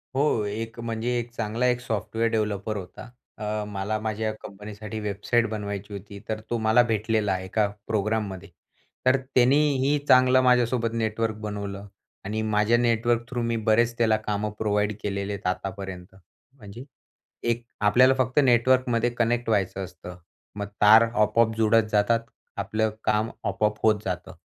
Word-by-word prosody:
हो. 135 -5 +2
एक 115 +3 -5
म्हणजे 115 0 -3
एक 120 0 -6
चांगला 115 +1 -2
एक 125 -1 +1
सॉफ्टवेअर 110 0 -1
डेव्हलपर 105 -1 -1
होता. 95 +5 -9 0.3
अ, 105 0 -3
मला 105 +1 -3
माझ्या 110 0 -2
कंपनीसाठी 105 +2 -8
वेबसाईट 105 +3 0
बनवायची 100 -1 -5
होती. 100 0 -9
तर 110 0 -2
तो 120 - 0
मला 110 +2 +4
भेटलेला 110 -2 0
आहे 95 0 -4
एका 105 +2 +1 0.2
प्रोग्राममध्ये. 105 -3 -2 0.6
तर 130 +1 +5 0.2
त्यानेही 140 +2 +3
चांगलं 130 0 +6
माझ्यासोबत 125 -2 +2
नेटवर्क 110 -1 -1
बनवलं 100 -1 -5 0.4
आणि 110 +2 -2
माझ्या 110 +1 +2
नेटवर्क 120 0 +1
थ्रू 120 0 -3
मी 115 0 -1
बरेच 120 +2 +3
त्याला 110 -2 +3
कामं 105 0 -1
प्रोव्हाईड 105 -1 0
केलेले 100 0 -2
आहेत 100 -2 -5
आतापर्यंत. 95 -1 -5 0.4
म्हणजे 110 +1 -10 0.7
एक 115 0 -1 0.2
आपल्याला 125 +5 +5
फक्त 130 +2 +1
नेटवर्कमध्ये 120 -1 +3
कनेक्ट 120 0 0
व्हायचं 95 -2 0
असतं. 90 0 -11 0.4
मग 100 -1 -4
तार 110 +2 +8
आपोआप 110 +1 +2
जुळत 115 0 +4
जातात, 105 +2 +3 0.4
आपलं 110 +2 0
काम 110 +1 +1 0.2
आपोआप 105 0 0
होत 110 -1 +4
जातं. 90 -3 -4
110 Hz, 145 wpm, -25 LUFS, 105-120 Hz, 0.7 s, तार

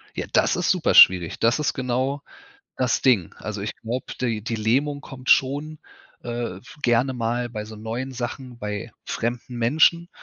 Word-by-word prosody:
Ja, - - -4
das - - +3
ist - - 0
super - - +2
schwierig, 90 -3 +7
das 115 +4 +3
ist 150 - 0
genau 130 +2 -1 0.6
das 125 -1 +1
Ding. 115 -10 +2
Also, 105 -2 -5
ich 105 - -4
glaube, 120 +3 -4
die 115 -4 -1
die 115 - -2
Lähmung 135 +7 0
kommt 130 -1 -8
schon, 145 +4 +2 0.5
äh, 120 -5 -4
f 100 - -15
gerne 125 +2 +2
mal 120 0 -1
bei 110 -2 -5
so 110 +1 -10
neuen 115 +5 -5
Sachen, 125 0 -6
bei 105 +1 -5
fremden 120 +1 -3
Menschen 160 +8 +3
120 Hz, 170 wpm, -23 LUFS, 110-130 Hz, 0.6 s, schwierig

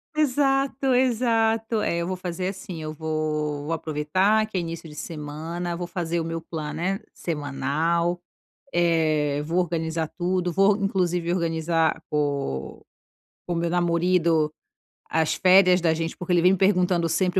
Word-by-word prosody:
Exato, 275 -2 +1
exato, 225 -3 +2
é, 170 - 0
eu 170 0 -2
vou 185 - -2
fazer 180 0 -3
assim, 190 -4 -6
eu 155 - -4
vou 155 -2 -2
vou 165 - -2
aproveitar, 165 +8 +1
que 200 - -4
é - - +2
início 165 -1 -5
de 150 - -12
semana, 165 +3 -5
vou 175 - -3
fazer 170 -1 -2
o - - -1
meu 165 0 -4
planner 165 +5 -4
semanal, 160 +3 -1 0.5
eh, 155 -4 +2
vou 165 +4 -2
organizar 165 -2 -1
tudo, 180 0 0
vou, 195 +3 +4
inclusive, 180 -4 0
organizar 165 -1 0
com 140 - -2 0.7
o 175 - -1
meu 170 0 0
"namorido", 170 -2 +2 0.6
as 160 0 +1
férias 185 -1 +5
da 165 -1 +2
gente, 165 0 -3
porque 180 0 -3
ele 175 - +4
vem 180 - +6
me 190 - +1
perguntando 180 -3 +2
sempre, 180 +3 +1
170 Hz, 150 wpm, -24 LUFS, 160-185 Hz, 0.7 s, vem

